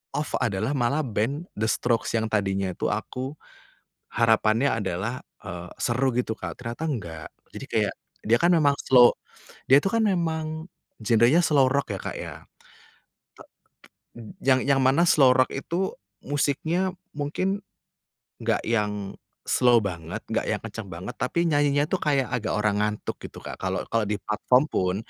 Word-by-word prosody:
off 150 Hz, +1 st, -2 dB
adalah 110 Hz, +6 st, 0 dB
malah 140 Hz, +4 st, +1 dB
band 125 Hz, +9 st, -2 dB
The 110 Hz, +1 st, 0 dB
Strokes 115 Hz, 0 st, 0 dB
yang 110 Hz, -, 0 dB
tadinya 95 Hz, -2 st, 0 dB
itu -, -, -2 dB
aku, 130 Hz, +4 st, -4 dB, 0.8 s
harapannya 115 Hz, +2 st, +3 dB
adalah, 110 Hz, +3 st, -3 dB, 0.2 s
eee, 90 Hz, +1 st, -7 dB
seru 130 Hz, +2 st, +1 dB
gitu, 115 Hz, -3 st, 0 dB
Kak. -, -, -6 dB
Ternyata 120 Hz, +6 st, -5 dB
enggak, 85 Hz, -, -5 dB, 0.3 s
jadi -, -, -7 dB
kayak -, -, +1 dB, 0.3 s
dia 120 Hz, +2 st, +4 dB
kan 175 Hz, -, +5 dB
memang 145 Hz, -4 st, +4 dB
slow 125 Hz, -2 st, +6 dB, 0.5 s
dia 140 Hz, +2 st, +7 dB
itu 195 Hz, -, 0 dB
kan 230 Hz, -1 st, +2 dB
memang 160 Hz, -3 st, -1 dB, 0.3 s
genrenya 120 Hz, +9 st, +4 dB
slow 150 Hz, -4 st, +4 dB
rock 140 Hz, -1 st, 0 dB
ya, 95 Hz, -, -5 dB
Kak, -, -, -5 dB
ya. -, -, -6 dB, 1.0 s
T -, -, -18 dB, 1.0 s
yang 130 Hz, -1 st, +4 dB
yang 140 Hz, -1 st, +3 dB
mana 135 Hz, +6 st, +4 dB
slow 135 Hz, -5 st, +6 dB
rock 130 Hz, 0 st, +3 dB
itu 170 Hz, +7 st, -2 dB, 0.3 s
musiknya 155 Hz, +6 st, 0 dB, 0.2 s
mungkin 185 Hz, +7 st, -1 dB, 0.8 s
enggak -, -, +1 dB
yang 105 Hz, -3 st, -1 dB, 0.3 s
slow 120 Hz, -2 st, +4 dB
banget, 85 Hz, -4 st, -5 dB
enggak -, -, -1 dB
yang -, -, 0 dB
kenceng -, -, -7 dB
banget, -, -, -7 dB
tapi 170 Hz, 0 st, 0 dB
nyanyinya 145 Hz, -1 st, +3 dB
tuh 190 Hz, -, 0 dB
kayak 140 Hz, -4 st, +2 dB
agak 115 Hz, -3 st, -1 dB
orang 105 Hz, -1 st, +1 dB
ngantuk 105 Hz, 0 st, -2 dB
gitu, -, -, -9 dB
Kak, -, -, -6 dB
kalau 95 Hz, 0 st, -2 dB
kalau 115 Hz, -1 st, +2 dB
di 105 Hz, -, -1 dB
platform 120 Hz, +6 st, +2 dB
pun 90 Hz, 0 st, 0 dB
125 Hz, 155 wpm, -25 LUFS, 110-145 Hz, 1.0 s, dia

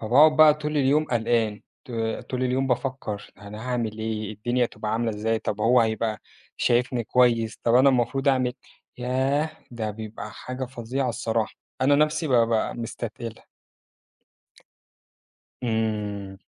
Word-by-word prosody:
فباقعد 145 Hz, +8 st, +5 dB
بقى 155 Hz, -1 st, +8 dB
طول 150 Hz, 0 st, -3 dB
اليوم 145 Hz, +2 st, +3 dB
قلقان، 115 Hz, -4 st, 0 dB, 0.2 s
ط -, -, -13 dB, 0.4 s
طول 130 Hz, 0 st, -1 dB
اليوم 130 Hz, +1 st, +1 dB
بافكّر، 125 Hz, -5 st, -3 dB
أنا 105 Hz, +4 st, -8 dB
هاعمِل 115 Hz, -3 st, -2 dB
إيه؟ 110 Hz, -1 st, -3 dB
الدنيا 120 Hz, +4 st, 0 dB
هتبقى 110 Hz, -2 st, -4 dB
عاملة 115 Hz, +1 st, 0 dB
إزاي؟ 110 Hz, +1 st, -1 dB
طَب 105 Hz, -1 st, -3 dB
هو 120 Hz, +3 st, +5 dB
هيبقى 110 Hz, -1 st, 0 dB, 0.4 s
شايفني 120 Hz, 0 st, +1 dB
كويس؟ 115 Hz, -2 st, +2 dB
طَب 115 Hz, -, +3 dB
أنا 130 Hz, +2 st, +7 dB
المفروض 135 Hz, +2 st, +1 dB
أعمل 130 Hz, -2 st, +2 dB, 0.5 s
ياه 135 Hz, +5 st, 0 dB, 0.2 s
ده 115 Hz, -3 st, -3 dB
بيبقى 110 Hz, 0 st, -7 dB
حاجة 130 Hz, +4 st, -5 dB
فظيعة 125 Hz, +1 st, -3 dB
الصراحة، 115 Hz, -1 st, -1 dB, 0.3 s
أنا 135 Hz, +2 st, +4 dB
نَفْسي 150 Hz, +2 st, +2 dB
ب -, -, 0 dB
ب 115 Hz, -1 st, +4 dB, 0.3 s
مستتقلها. 115 Hz, 0 st, -6 dB, 2.2 s
إمم. 105 Hz, -4 st, -2 dB
120 Hz, 135 wpm, -25 LUFS, 110-130 Hz, 2.2 s, بقى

